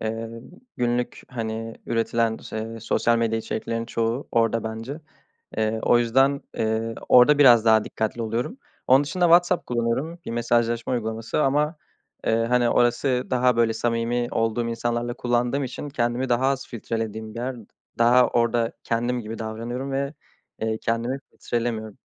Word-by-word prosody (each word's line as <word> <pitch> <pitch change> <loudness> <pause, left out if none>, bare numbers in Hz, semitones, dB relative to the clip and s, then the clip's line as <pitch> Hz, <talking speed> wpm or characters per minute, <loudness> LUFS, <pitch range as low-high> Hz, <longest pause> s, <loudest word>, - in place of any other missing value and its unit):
eee, 115 +1 -3 0.5
günlük, 120 0 -1
hani, 115 -2 -4
üretilen 115 0 0
ş 110 - -8
eee, 115 +1 -5
sosyal 115 +1 +1
medya 115 -1 +1
içeriklerinin 115 +1 -3
çoğu 115 +3 -2
orada 115 -1 +2
bence. 115 +7 -5 0.6
Eee, 110 0 0
o 120 - +4
yüzden, 135 +4 +3
eee, 110 +1 -1
orada 125 +4 +7
biraz 120 -6 +7
daha 110 -1 +5
dikkatli 110 +2 -3
oluyorum. 115 - -3 0.3
Onun 135 +3 +5
dışında 180 +5 -1
WhatsApp 175 +1 +4
kullanıyorum, 120 +8 -1
bir - - -5
mesajlaşma 120 0 0
uygulaması 110 +2 -1
ama, 150 +4 +1 0.5
eee, 110 - +3
hani, 120 -1 +3
orası 125 +1 +2
daha 125 -1 +3
böyle 115 -1 +3
samimi 120 +1 -1
olduğum 115 +1 0
insanlarla 120 +1 -2
kullandığım 120 +3 0
için 130 +3 -6
kendimi 120 0 -1
daha 125 +2 +2
az 135 -1 0
filtrelediğim 110 -1 -4
bir - - -6
yer 130 0 -3 0.4
daha 120 +2 +5
orada 115 -1 +1
kendim 120 +2 0
gibi 115 0 -7
davranıyorum 115 +5 -4
ve, 140 +2 -2 0.5
eee, 110 0 -1
kendimi 115 +4 -1
filtrelemiyorum. 115 -3 -3
120 Hz, 145 wpm, -24 LUFS, 115-125 Hz, 0.6 s, orada